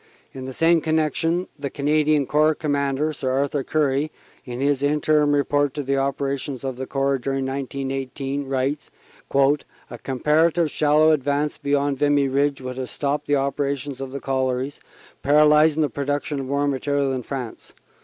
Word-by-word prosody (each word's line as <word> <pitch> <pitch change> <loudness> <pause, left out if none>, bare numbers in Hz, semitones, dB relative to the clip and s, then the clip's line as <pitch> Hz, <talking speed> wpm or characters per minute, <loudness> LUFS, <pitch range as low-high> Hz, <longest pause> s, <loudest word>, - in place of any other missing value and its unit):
In 130 -1 -7
the 130 - -5
same 165 +4 +3
connection 160 +3 0
the 140 -1 -3
Canadian 150 +1 +1
Corps 155 +3 +3
Com 150 -1 -3
mander, 140 +2 0
Sir 135 -2 -3
Arthur 140 +1 0
Currie, 150 0 0 0.3
in 125 -1 -6
his 140 0 +1
Interim 150 +1 +2
Report 145 0 +1
on 145 - -2
the 140 +1 +1
opera 140 0 -1
tions 135 -2 -6
of 130 -2 -4
the 130 0 -5
Corps 135 -1 0
during 135 +1 -2
1918, 135 +1 -4
writes: 135 +2 -2 0.4
"A 140 +1 0
comparative 155 +4 +2
shal 150 0 +2
low 155 0 +6
advance 145 0 0
beyond 140 -1 0
the 145 - +3
Vimy 145 -1 +3
Ridge 140 +1 0
would 130 0 -6
have 130 -1 -4
stopped 145 +1 -2
the 145 - +3
operation 140 0 -1
of 135 -1 -5
the 140 - -5
collieries, 130 0 -2 0.4
paralysing 150 +2 +5
the - - +2
production 145 +1 -2
of 130 -1 -5
war 140 +1 +1
material 140 0 0
in 130 - -2
France. 125 -2 -7
140 Hz, 170 wpm, -23 LUFS, 135-150 Hz, 0.4 s, low